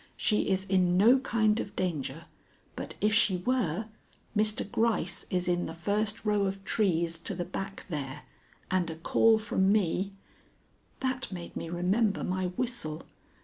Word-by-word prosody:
She 210 -2 +2
is 190 0 +1
in 180 -2 +3
no 235 +7 +6
kind 220 -4 +2
of 200 - -5
danger, 165 -3 -2 0.5
but - - -6
if 215 +1 +3
she 210 -4 +4
were, 215 -2 0 0.5
Mr. 215 0 +1
Gryce 210 -5 0
is 180 -1 -1
in 175 0 +1
the 165 - -7
first 210 +5 -1
row 205 -2 +2
of 195 0 -5
trees 170 -5 +1
to 195 - -4
the 175 0 -3
back 195 +2 -6
there, 145 -4 -5 0.5
and 185 -2 +1
a 160 - -5
call 220 +7 +4
from 195 -3 +1
me 195 -1 +1 0.4
" - - -37
That 260 -2 -1
made 175 -2 -7
me 165 - -4
remember 190 +5 +1
my 185 0 -1
whistle. 185 -5 -3
190 Hz, 160 wpm, -29 LUFS, 175-215 Hz, 0.5 s, no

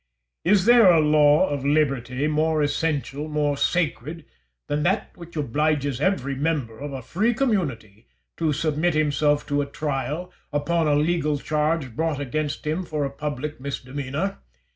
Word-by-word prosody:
Is 190 +1 +3
there 235 -4 +7
a 165 - +5
law 150 +2 +5
of 140 -2 -3
liberty 140 -3 +1
more 155 0 +1
essential, 145 -1 -1
more 150 -1 0
sacred, 155 -1 -1 0.4
than 145 +1 -1
that 190 +7 0
which 170 -1 -12
obliges 145 -1 0
every 140 -7 0
member 135 -6 -2
of 145 +1 -5
a 135 -2 -6
free 215 - 0
community 140 - -2 0.3
to 160 -2 +1
submit 155 +2 0
himself 150 -1 +2
to 145 0 0
a 140 - -3
trial, 150 +5 -3 0.2
upon 160 +3 0
a 145 - +3
legal 150 -1 +1
charge 150 -3 -1
brought 160 -1 -1
against 145 +3 -3
him 160 +5 -1
for 150 -4 -2
a 135 - -4
public 145 0 -5
misdemeanour? 140 +6 -4
150 Hz, 150 wpm, -24 LUFS, 140-160 Hz, 0.4 s, there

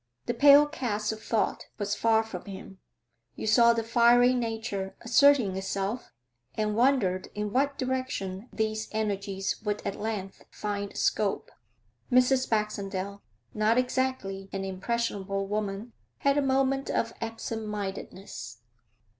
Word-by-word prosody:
The - - -1
pale 285 +3 +8
cast 225 -8 -2
of 220 0 -7
thought 225 - -1
was 205 0 -1
far 220 +1 +3
from 200 -5 -8
him; 195 -1 -9 0.6
you - - -5
saw 235 +2 +6
the 230 -1 0
fiery 240 +2 +5
nature 225 -5 -3
asserting 245 -5 +4
itself, 195 +4 -3 0.4
and 210 -1 0
wondered 225 -7 +2
in 210 0 -3
what 280 +2 +1
direction 255 -6 -3
these 220 0 -2
energies 200 -2 -2
would 210 -1 -1
at 200 - -2
length 205 -3 -4
find 205 -1 -4
scope. 205 -2 0 0.6
Mrs. 255 +1 +4
Baxendale, 200 -2 -2 0.3
not 215 +2 +2
exactly 250 -7 -1
an 195 0 -3
impressionable 195 0 -2
woman, 210 +2 -3 0.2
had 280 0 +2
a 290 - +3
moment 270 0 +1
of 230 0 0
absent 225 -1 -4
mindedness. 190 - -6
215 Hz, 130 wpm, -28 LUFS, 195-245 Hz, 0.6 s, pale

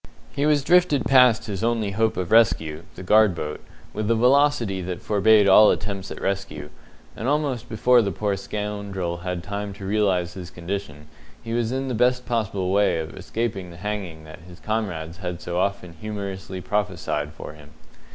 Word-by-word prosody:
He 145 +1 0
was 150 -2 +3
drifted 175 -3 +3
past 125 -4 +5
his 100 -1 -4
only 115 -3 0
hope 110 +2 0
of 90 -2 -3
rescue 80 -9 +3
the - - -8
guard 105 0 +4
boat 75 -2 -5 0.3
with 110 0 -2
a 115 - +4
velocity 125 -5 +3
that 90 -1 -5
forbade 105 0 +4
all 105 +2 +8
attempts 100 -2 -2
at - - -7
rescue, 80 -7 -4 0.4
and 115 - -4
almost 140 -5 -1
before 120 +2 +4
the 100 -3 -1
poor 100 +2 -1
scoundrel 100 -3 -4
had 90 0 -4
time 100 +1 -5
to 100 0 -9
realize 95 -4 +1
his 90 -2 -8
condition, 85 -4 -6 0.4
he 115 -1 -5
was 120 -1 0
in 135 +1 -2
the 130 - -2
best 125 +2 +2
possible 100 -6 -1
way 100 -2 +3
of 80 -1 -5
escaping 105 -6 -4
the 85 - -12
hanging 95 -5 -5
that 80 +2 -12
his 85 +1 -14
comrades 90 -7 -3
had 90 -2 -5
so 90 0 -3
often 95 -2 -2
humorously 95 -1 -6
prophesied 90 -8 -2
for 75 - -9
him. 75 -1 -15
100 Hz, 180 wpm, -23 LUFS, 90-115 Hz, 0.4 s, all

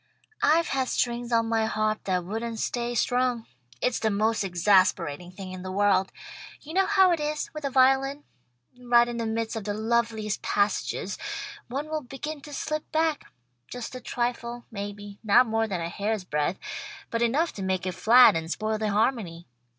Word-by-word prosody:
"I've 330 +3 +3
had 265 -1 0
strings 240 0 -1
on 230 -1 +3
my 225 -1 +1
harp 215 0 -1
that 180 -2 0
wouldn't 225 +4 -4
stay 240 +1 -2
strung. 245 -1 +1 0.4
It's 250 - +1
the 220 - +1
most 215 +1 +1
exasperating 180 -3 +2
thing 185 0 -8
in 185 0 -7
the 185 0 -6
world. 195 -1 +2 0.5
You 315 - -10
know 385 +1 +3
how 385 -3 +5
it 340 - +1
is, 300 0 -2
with 305 -2 -6
a - - +1
violin. 270 +2 +3 0.5
Right 240 -1 +4
in 240 -1 -4
the 230 -1 -2
midst 225 +1 -2
of 220 - -4
the 205 0 -3
loveliest 220 -1 0
passages 200 -1 -1 0.5
one 275 +5 -4
will 310 0 -2
begin 285 +3 -6
to 295 - -11
slip 305 +2 -4
back 315 -1 +1 0.4
just 245 0 -7
a 255 - -7
trifle, 240 -1 -3
maybe, 205 -1 -7
not 225 +4 +6
more 225 -1 0
than 185 -5 -3
a 165 - -3
hair's 205 +2 -2
breadth, 150 +1 -1 0.5
but 230 - -1
enough 280 +9 +1
to 200 - -7
make 190 -1 -1
it 185 - -1
flat 230 +7 +7
and 165 0 -3
spoil 215 +4 -2
the 215 -1 0
harmony. 205 -6 0
225 Hz, 180 wpm, -26 LUFS, 200-255 Hz, 0.5 s, flat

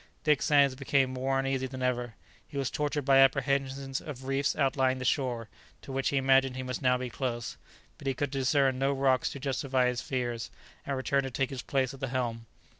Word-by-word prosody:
Dick 150 -2 +3
Sands 140 -3 +4
became 135 0 +1
more 135 +1 0
uneasy 135 -1 0
than 130 0 -6
ever; 120 -3 -1 0.3
he 140 - -8
was 135 -2 -1
tortured 145 -1 -1
by 135 -1 +6
apprehensions 135 0 +2
of 135 -4 -8
reefs 135 +1 0
outlying 135 -2 +2
the 130 - -5
shore, 120 -4 0 0.4
to - - -8
which 135 0 0
he 140 - 0
imagined 135 -1 +3
he 130 - -4
must 125 -1 -4
now 125 -1 +3
be 125 0 -4
close; 120 -1 -3 0.4
but 140 - -7
he 135 - 0
could 145 +1 -2
discern 135 -1 +2
no 135 +1 +2
rocks 135 -1 +2
to 140 - -7
justify 135 -1 0
his 125 -1 -2
fears, 120 -3 -3 0.4
and 140 -1 -1
returned 140 +1 +1
to - - -3
take 135 +1 -1
his 130 -2 -4
place 135 -1 0
at 135 - -11
the 135 - -2
helm. 120 -3 -3
135 Hz, 210 wpm, -29 LUFS, 130-140 Hz, 0.4 s, by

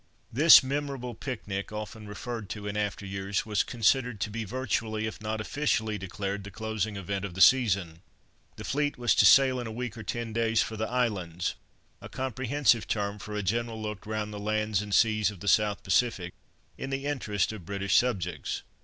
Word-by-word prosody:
This 150 +4 +9
memorable 135 -2 -3
picnic, 105 -5 -5
often 105 0 -7
referred 110 0 -6
to 105 -1 -6
in 100 0 -3
after 105 -1 -2
years, 95 0 -2
was 105 -1 +1
considered 125 -1 +1
to 110 - -1
be 115 +1 -3
virtually, 110 -2 -2
if 110 - -6
not 110 0 -3
officially 110 -4 -1
declared, 100 +1 -4
the 100 - -8
closing 110 0 -3
event 100 0 -3
of 95 -3 -5
the - - -6
season. 95 -9 +4 0.5
The - - -8
fleet 145 +1 -1
was 120 -2 +3
to 105 - +6
sail 130 +1 +6
in 120 - -4
a - - -5
week 120 0 -4
or 110 - -7
ten 115 +2 -4
days 115 0 +1
for 110 - -6
"the 110 +1 -2
islands," 100 -9 -1 0.5
a - - -9
comprehensive 130 -1 +1
term 105 -1 -2
for 105 +1 -7
a 105 - -2
general 115 +3 -1
look 105 -2 -6
round 105 -1 -3
the 105 - -6
lands 110 -1 0
and 105 0 -7
seas 110 -1 +3
of 100 -4 -9
the 100 - -8
South 105 +1 +3
Pacific, 95 -3 +1 0.5
in 135 - -4
the 135 +1 -3
interests 110 -10 -1
of 95 -7 -10
British 100 0 -2
subjects. 90 - 0
110 Hz, 190 wpm, -28 LUFS, 100-120 Hz, 0.5 s, This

